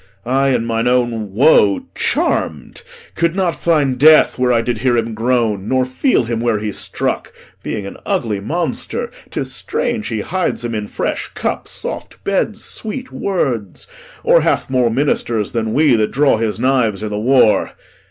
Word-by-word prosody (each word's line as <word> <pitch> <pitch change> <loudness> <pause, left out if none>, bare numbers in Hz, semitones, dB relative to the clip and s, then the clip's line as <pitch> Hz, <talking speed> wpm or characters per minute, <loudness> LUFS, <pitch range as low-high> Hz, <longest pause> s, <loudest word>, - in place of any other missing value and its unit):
I, 135 +3 +2
in 120 -3 +1
mine 115 +1 0
own 120 -4 0
woe 105 -3 +4
charm'd, 75 -5 -1 0.3
Could 170 +1 0
not 185 -3 0
find 145 -6 +1
death 155 -2 +6
where 125 0 +2
I 115 -1 +2
did 120 -2 -2
hear 120 0 +2
him 115 0 -1
groan, 110 -3 0
Nor 130 +1 +2
feel 130 - +1
him 115 -1 -2
where 115 -2 +1
he 105 0 -3
struck. - - -3 0.3
Being 105 -3 -4
an 100 - -8
ugly 105 -4 -1
monster, 175 - -3 0.2
'Tis - - -4
strange 235 -3 -2
he 110 -3 -2
hides 180 - -2
him 120 - -3
in 105 -1 -3
fresh - - -3
cups, - - -3
soft - - -6
beds, 200 +2 -1
Sweet 250 +4 -6
words; 125 - -2 0.4
or - - +5
hath - - 0
moe 125 -2 +3
ministers 115 -4 0
than 110 -2 -2
we 145 +1 +4
That 110 -1 +1
draw 140 -2 +3
his 110 -1 -2
knives 120 -6 +1
i' - - -2
th' - - -6
war. 110 +2 +3
120 Hz, 170 wpm, -17 LUFS, 110-145 Hz, 0.4 s, death